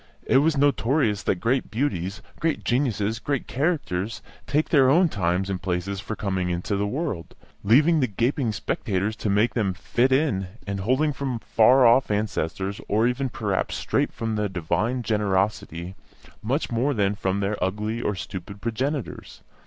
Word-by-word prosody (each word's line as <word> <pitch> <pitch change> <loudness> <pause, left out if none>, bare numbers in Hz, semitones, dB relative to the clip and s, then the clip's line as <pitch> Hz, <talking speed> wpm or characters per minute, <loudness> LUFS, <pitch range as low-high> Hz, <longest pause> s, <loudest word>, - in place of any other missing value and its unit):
It 130 - +4
was 155 +1 +2
notorious 135 -6 +2
that - - +1
great 120 +8 0
beauties, 105 - -2 0.2
great 160 -2 -1
geniuses, 115 -4 0
great 140 0 -2
characters, 125 - -2 0.2
take 150 +2 +1
their 135 -4 +5
own 170 +5 +5
times 90 - 0
and 95 -2 -3
places 95 +2 -2
for 105 +2 -5
coming 95 -4 -2
into 90 +4 -2
the 100 +1 0
world, 105 - -4 0.3
leaving 150 +10 +5
the 130 - +2
gaping 120 +3 0
spectators 100 +1 -2
to 105 - -2
make 105 +4 +2
them 100 -6 0
"fit 120 +6 +1
in," 130 -9 +1 0.2
and 100 -1 -3
holding 130 +9 +1
from 135 -3 -3
far 125 +3 +4
off 120 +3 +5
ancestors, 100 -2 -2
or 110 +3 +2
even, 125 +2 0
perhaps, 105 -5 -2
straight - - 0
from 115 -1 -3
the 105 -1 0
divine 105 +8 -1
generosity, 100 -4 -1 0.5
much 130 +7 -1
more 130 +5 +1
than 100 -2 +2
from 95 -1 -1
their 100 0 -1
ugly 105 +5 -2
or 105 - -1
stupid 95 +1 -7
progenitors. 130 +5 -4
110 Hz, 160 wpm, -25 LUFS, 100-130 Hz, 0.5 s, their